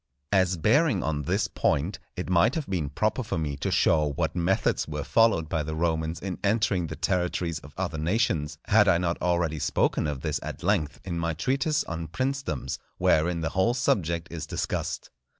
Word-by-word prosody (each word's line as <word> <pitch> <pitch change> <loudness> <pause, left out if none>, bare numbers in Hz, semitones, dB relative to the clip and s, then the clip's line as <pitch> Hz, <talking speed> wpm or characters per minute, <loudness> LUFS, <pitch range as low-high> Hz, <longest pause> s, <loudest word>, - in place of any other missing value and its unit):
As 95 -2 +3
bearing 115 - +3
on 75 -2 -1
this 70 - 0
point, 80 +8 0 0.2
it 90 - -4
might 90 +6 +3
have 160 -3 -2
been 85 -7 -1
proper 110 - 0
for 110 - -3
me 75 -3 -2
to - - -2
show 75 -3 +3
what - - -1
methods 90 +2 +1
were 75 -1 -4
followed 110 -1 +3
by 80 0 -1
the 80 +1 -4
Romans 80 0 -1
in 95 0 -5
entering 100 -4 +1
the - - -6
territories 90 -2 -1
of 75 -1 -14
other 90 -4 -2
nations, 80 -3 0
had 105 -1 +5
I 90 -3 +5
not 85 -1 -1
already 85 -3 +1
spoken 75 - +1
of 70 -3 -3
this 75 -1 -1
at - - -7
length 85 -6 0
in 85 -3 -3
my 85 -1 -1
Treatise 135 - +1
on 80 0 -5
Princedoms, 130 - -2 0.2
wherein 85 +2 +2
the 80 - -1
whole 115 +6 +1
subject 85 -8 0
is 85 -2 -5
discussed. - - -3
85 Hz, 185 wpm, -27 LUFS, 80-100 Hz, 0.2 s, had